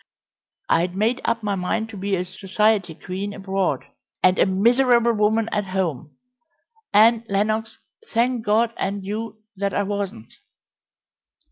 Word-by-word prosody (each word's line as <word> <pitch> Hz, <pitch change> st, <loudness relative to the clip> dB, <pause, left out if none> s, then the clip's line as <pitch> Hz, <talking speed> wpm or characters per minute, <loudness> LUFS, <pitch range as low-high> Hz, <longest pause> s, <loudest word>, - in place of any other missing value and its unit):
I'd 175 Hz, +2 st, +1 dB
made 225 Hz, +6 st, +1 dB
up 230 Hz, -1 st, 0 dB
my 205 Hz, -1 st, 0 dB
mind 200 Hz, +4 st, -2 dB
to 220 Hz, -, -9 dB
be 195 Hz, 0 st, -1 dB
a 180 Hz, 0 st, -2 dB
society 195 Hz, -1 st, 0 dB
queen 195 Hz, +4 st, -5 dB
abroad, 195 Hz, -1 st, -2 dB, 0.4 s
and 185 Hz, 0 st, +4 dB
a -, -, +5 dB
miserable 235 Hz, +4 st, +3 dB
woman 220 Hz, +1 st, +2 dB
at 205 Hz, -1 st, -1 dB
home 180 Hz, -7 st, -3 dB, 0.7 s
and, 225 Hz, +2 st, +5 dB
Lenox, 215 Hz, +3 st, -1 dB, 0.3 s
thank 240 Hz, 0 st, +1 dB
God 225 Hz, +2 st, +2 dB
and 195 Hz, 0 st, -3 dB
you, 215 Hz, +1 st, -5 dB
that 200 Hz, -1 st, -1 dB
I 205 Hz, -, +1 dB
wasn't!" 200 Hz, -, -4 dB
205 Hz, 135 wpm, -22 LUFS, 190-225 Hz, 0.7 s, a